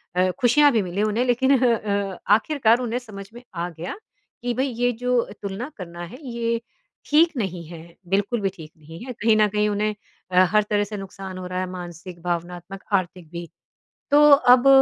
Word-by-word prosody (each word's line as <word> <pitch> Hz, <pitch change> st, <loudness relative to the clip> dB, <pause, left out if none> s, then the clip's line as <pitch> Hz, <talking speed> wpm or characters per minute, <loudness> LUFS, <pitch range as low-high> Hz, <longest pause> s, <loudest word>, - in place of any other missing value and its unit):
अ, 185 Hz, +1 st, +3 dB
खुशियाँ 285 Hz, +4 st, +5 dB
भी 225 Hz, -3 st, +2 dB
मिली 185 Hz, +3 st, -2 dB
उन्हें 215 Hz, +3 st, +1 dB
लेकिन 255 Hz, +2 st, +2 dB
ह 240 Hz, -2 st, +5 dB
अ, 200 Hz, -3 st, -2 dB, 0.2 s
आखिरकार 235 Hz, 0 st, +3 dB
उन्हें 245 Hz, 0 st, -2 dB
समझ 205 Hz, -5 st, -10 dB
में 240 Hz, -, -11 dB
आ 170 Hz, +1 st, -2 dB
गया 165 Hz, -, -6 dB, 0.5 s
कि 245 Hz, 0 st, -1 dB
भई 260 Hz, +3 st, 0 dB
ये 245 Hz, 0 st, 0 dB
जो 250 Hz, 0 st, 0 dB, 0.3 s
तुलना 205 Hz, +7 st, -5 dB
करना 175 Hz, -2 st, -7 dB
है, 175 Hz, +9 st, -9 dB
ये 235 Hz, -1 st, -1 dB, 0.5 s
ठीक 325 Hz, +3 st, +5 dB
नहीं 185 Hz, -6 st, -3 dB
है, 170 Hz, 0 st, -12 dB
बिल्कुल 200 Hz, +4 st, 0 dB
भी 195 Hz, -, +1 dB
ठीक 155 Hz, -3 st, -11 dB
नहीं 160 Hz, +2 st, -12 dB
है। 255 Hz, -, -5 dB
कहीं 225 Hz, -1 st, +2 dB
न 210 Hz, -1 st, +5 dB
कहीं 210 Hz, +1 st, +1 dB
उन्हें 210 Hz, +1 st, -1 dB, 0.4 s
अ, 180 Hz, +1 st, +6 dB
हर 210 Hz, 0 st, +4 dB
तरह 205 Hz, -1 st, +2 dB
से 210 Hz, 0 st, -6 dB
नुकसान 195 Hz, -1 st, -8 dB
हो 185 Hz, -, -6 dB
रहा 185 Hz, 0 st, -3 dB
है 185 Hz, -1 st, -3 dB
मानसिक, 175 Hz, -1 st, -9 dB
भावनात्मक, 175 Hz, +2 st, -4 dB
आर्थिक 180 Hz, -3 st, -1 dB
भी। 170 Hz, -1 st, -7 dB, 0.6 s
तो 290 Hz, -, +6 dB, 0.4 s
अब 255 Hz, +2 st, 0 dB
205 Hz, 195 wpm, -23 LUFS, 180-235 Hz, 0.6 s, अ